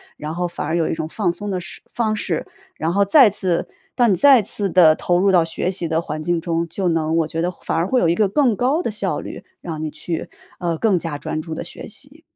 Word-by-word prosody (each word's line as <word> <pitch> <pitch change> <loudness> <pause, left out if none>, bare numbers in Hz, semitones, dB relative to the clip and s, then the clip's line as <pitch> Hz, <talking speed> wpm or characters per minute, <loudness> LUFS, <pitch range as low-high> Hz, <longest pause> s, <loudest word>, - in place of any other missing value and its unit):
然 155 +2 -6
后 175 0 -1
反 170 - -5
而 165 - 0
有 165 - +1
一 - - -1
种 160 0 -4
放 180 -4 0
松 205 +2 -6
的 185 -2 -1
式 175 - -9
方 220 -2 0
式， 175 -6 -2 0.3
然 165 +2 -2
后 200 - +3
再 220 +1 +6
次 185 -4 +1 0.3
到 245 -2 +4
你 205 - +4
再 260 +3 +6
次 200 0 0
地 165 -4 +6
投 175 0 +1
入 195 +1 +3
到 175 -3 +5
学 165 +3 -2
习 175 -3 -2
的 160 +1 0
环 155 -1 -5
境 175 +1 0
中， 165 0 -2
就 180 +3 -2
能 165 -1 +1
我 165 -2 +1
觉 160 +1 -3
得 175 - 0
反 175 - -5
而 165 +3 +1
会 255 +2 +2
有 170 - +2
一 165 - +3
个 205 +2 +2
更 245 0 +2
高 280 - +1
地 - - -2
效 210 - -2
率， - - -8 0.2
让 160 -3 -6
你 155 - -2
去， 160 +2 -5 0.3
呃， 170 -2 -1
更 195 -2 +2
加 160 -3 -4
专 155 +2 -4
注 160 0 -6
地 - - -5
学 - - -9
习。 - - -10
175 Hz, 280 characters per minute, -20 LUFS, 165-200 Hz, 0.3 s, 再